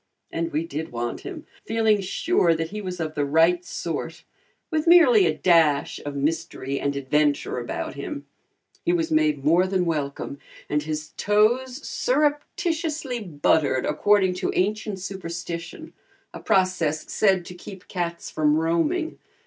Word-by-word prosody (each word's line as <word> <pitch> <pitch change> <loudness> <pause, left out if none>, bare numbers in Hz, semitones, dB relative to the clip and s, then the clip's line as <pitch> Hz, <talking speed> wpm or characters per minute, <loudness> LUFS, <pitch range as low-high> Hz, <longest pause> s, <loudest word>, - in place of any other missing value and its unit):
And 165 0 -2
we 155 +2 -1
did 160 -1 -5
want 120 0 -3
him, 345 -6 -8 0.2
feeling 220 -2 +2
sure 190 - +2
that 165 0 -3
he 210 0 -5
was 185 -2 -5
of 155 -2 -3
the 145 - 0
right 165 +5 +3
sort, 165 -1 -5 0.5
with 315 0 0
merely 365 +5 +7
a - - -1
dash 160 -5 +3
of 145 -1 -5
mystery 140 -2 -2
and 140 0 -1
adventure 145 0 +1
about 120 - -4
him. - - -6 0.6
He 175 - +2
was 165 -2 0
made 155 -3 +2
more 175 +4 +4
than 185 -1 0
welcome, 140 -3 -3 0.3
and 150 0 0
his 155 0 -4
toes 240 +6 +1
surreptitiously 310 - -1
buttered 150 - +1
according 190 +4 +3
to - - 0
ancient 210 +1 0
superstition, 175 - -6 0.4
a - - -7
process 180 -5 +1
said 190 -4 +2
to 180 - -8
keep 185 +1 -11
cats 170 -2 -4
from 150 -1 +2
roaming. 170 - 0
170 Hz, 145 wpm, -24 LUFS, 155-210 Hz, 0.6 s, merely